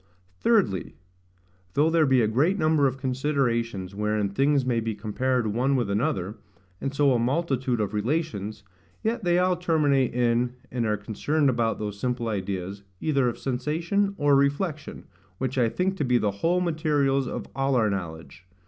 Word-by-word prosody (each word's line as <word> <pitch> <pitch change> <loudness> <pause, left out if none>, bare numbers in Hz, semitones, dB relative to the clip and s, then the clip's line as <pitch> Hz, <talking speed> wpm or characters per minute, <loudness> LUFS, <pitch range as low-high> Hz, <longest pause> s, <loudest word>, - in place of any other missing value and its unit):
Thirdly, 120 - +1 0.8
Though 155 +3 +3
there 160 -2 +4
be 130 -3 +4
a - - +2
great 145 - +2
number 155 -4 +3
of 130 0 -3
considerations 125 -7 -1
wherein 105 0 0
things 135 +6 +2
may 120 -2 +1
be 110 -1 -2
compared 120 +4 -1
one 125 +6 +1
with 120 -6 0
another, 105 - -1 0.4
and 135 - -2
so 140 -1 +3
a 120 - +2
multitude 130 -2 0
of 105 -1 -1
relations, 105 - -2 0.4
yet 230 +1 -1
they 175 -1 +3
all 180 0 +3
terminate 150 -7 +2
in, 120 0 +1 0.2
and 120 -3 -1
are 105 0 +1
concerned 135 +8 0
about 115 -2 0
those 105 -1 -5
simple 125 0 -1
ideas, 95 -1 -4 0.2
either 140 -5 +1
of 120 - -6
sensation 165 +10 -1
or 145 -1 +4
reflection, 145 +3 -1 0.3
which 130 +2 -2
I 120 -2 +3
think 190 +8 -1
to - - 0
be 125 -2 +3
the 105 -3 +1
whole 165 - 0
materials 150 -5 +1
of - - -4
all 135 0 +1
our 110 -4 +2
knowledge. 90 -1 -6
130 Hz, 165 wpm, -26 LUFS, 110-150 Hz, 0.8 s, there